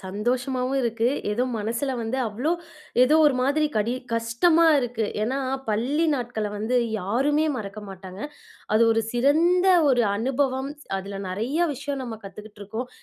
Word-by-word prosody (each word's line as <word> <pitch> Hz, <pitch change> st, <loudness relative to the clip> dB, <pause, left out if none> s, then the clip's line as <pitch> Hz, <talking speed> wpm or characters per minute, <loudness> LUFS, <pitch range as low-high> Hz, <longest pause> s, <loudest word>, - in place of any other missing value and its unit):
சந்தோஷமாவும் 250 Hz, +6 st, -1 dB
இருக்கு. 230 Hz, 0 st, +1 dB, 0.2 s
ஏதோ 245 Hz, +4 st, 0 dB, 0.2 s
மனசுல 230 Hz, +6 st, -2 dB
வந்து 225 Hz, +3 st, -2 dB
அவ்ளோ 250 Hz, +10 st, -1 dB, 0.5 s
ஏதோ 270 Hz, +5 st, +5 dB
ஒரு 290 Hz, -, +3 dB
மாதிரி 295 Hz, +3 st, +2 dB
கடி 220 Hz, +3 st, +1 dB, 0.2 s
கஷ்டமா 235 Hz, +9 st, +3 dB
இருக்கு. 240 Hz, -3 st, -1 dB, 0.2 s
ஏன்னா, 255 Hz, +5 st, -1 dB, 0.3 s
பள்ளி 255 Hz, +10 st, +1 dB
நாட்கள 240 Hz, -5 st, -3 dB
வந்து 220 Hz, +4 st, 0 dB, 0.2 s
யாருமே 270 Hz, +11 st, +1 dB
மறக்க 210 Hz, -2 st, -6 dB
மாட்டாங்க. 190 Hz, 0 st, -9 dB, 0.5 s
அது 220 Hz, -, +5 dB
ஒரு 225 Hz, -, +2 dB
சிறந்த 320 Hz, +9 st, +3 dB, 0.2 s
ஒரு 250 Hz, -3 st, +4 dB
அனுபவம். 265 Hz, +3 st, -1 dB, 0.3 s
அதுல 195 Hz, +1 st, -6 dB
நெறைய 225 Hz, -, -2 dB, 0.2 s
விஷயம் 285 Hz, 0 st, -4 dB
நம்ம 230 Hz, -3 st, -6 dB
கத்துக்கிட்ருக்கோம். 210 Hz, +3 st, -7 dB
245 Hz, 135 wpm, -24 LUFS, 215-275 Hz, 0.5 s, ஏதோ